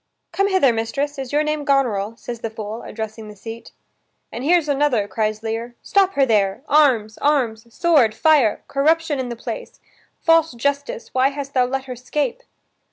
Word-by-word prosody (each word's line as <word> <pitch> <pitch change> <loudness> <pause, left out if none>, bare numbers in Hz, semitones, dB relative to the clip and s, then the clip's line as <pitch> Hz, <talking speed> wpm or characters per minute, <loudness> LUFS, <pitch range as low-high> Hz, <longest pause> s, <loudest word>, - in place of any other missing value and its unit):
"Come 395 0 +1
hither, 375 -11 +3
mistress. 275 +6 -2
Is 265 -2 -5
your 295 +1 +2
name 305 -1 -2
Goneril?" 230 -7 +1
says 240 -2 -7
the 225 - -4
fool, 220 +1 -6
addressing 220 0 -7
the 210 - -10
seat. 225 +3 -9 0.6
"And 240 - -6
here's 335 +1 +3
another," 280 -7 +1
cries 215 0 -2
Lear. 230 +2 -4
"Stop 390 -1 +2
her 275 - +3
there! 205 -1 +1
arms, 250 -8 +3
arms, 235 -6 0
sword, 280 -8 +3
fire! 295 -9 +3
Corruption 310 +1 +1
in 255 -1 -3
the 240 - -4
place! 475 - -7 0.4
False 330 -3 +3
justice, 280 0 -3
why 260 +1 +4
hast 280 -1 -6
thou 255 -1 +3
let 270 +1 -2
her 255 -1 -6
'scape?" 300 - -2
260 Hz, 170 wpm, -21 LUFS, 225-295 Hz, 0.6 s, why